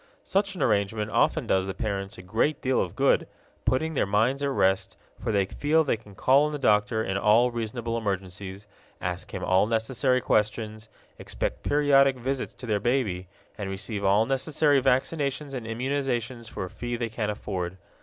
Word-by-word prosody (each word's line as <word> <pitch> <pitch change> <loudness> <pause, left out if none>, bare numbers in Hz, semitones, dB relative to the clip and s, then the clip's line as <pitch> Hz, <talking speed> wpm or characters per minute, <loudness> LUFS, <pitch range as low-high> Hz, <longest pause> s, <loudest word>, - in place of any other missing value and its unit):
Such 195 0 0
an - - -1
arrangement 105 0 +1
often - - +2
does 95 0 +1
the 95 - -4
parents 100 -1 -3
a 90 - -10
great 115 +10 0
deal 130 -1 +1
of 90 - -4
good, - - +3 0.4
putting 160 +5 +1
their 135 - +1
minds 115 +7 +2
at 140 - +1
rest, 95 -7 +1 0.2
for - - -2
they 100 -2 +2
feel 150 +10 +2
they 140 - +1
can 105 -3 -15
call 135 +8 +4
on - - -4
the 150 - -3
doctor 110 -3 +2
in 95 -1 -1
all 110 +5 +4
reasonable 115 0 -3
emergencies, 100 -2 -4 0.3
ask 90 0 -4
him 95 - -5
all 95 +3 +3
necessary 125 +3 +1
questions, 110 0 -1 0.3
expect - - -3
periodic 140 -2 +4
visits 130 +2 -3
to - - -9
their 105 -3 +1
baby, 105 -7 0 0.3
and 100 -2 -3
receive 100 +2 -4
all 100 +3 +4
necessary 140 +1 +2
vaccinations 140 +2 0
and 120 -4 -5
immunizations 120 -1 -2
for - - -5
a - - -8
fee 120 0 -4
they 120 0 -2
can 110 -1 -2
afford. 95 -3 -4
115 Hz, 180 wpm, -26 LUFS, 100-135 Hz, 0.4 s, call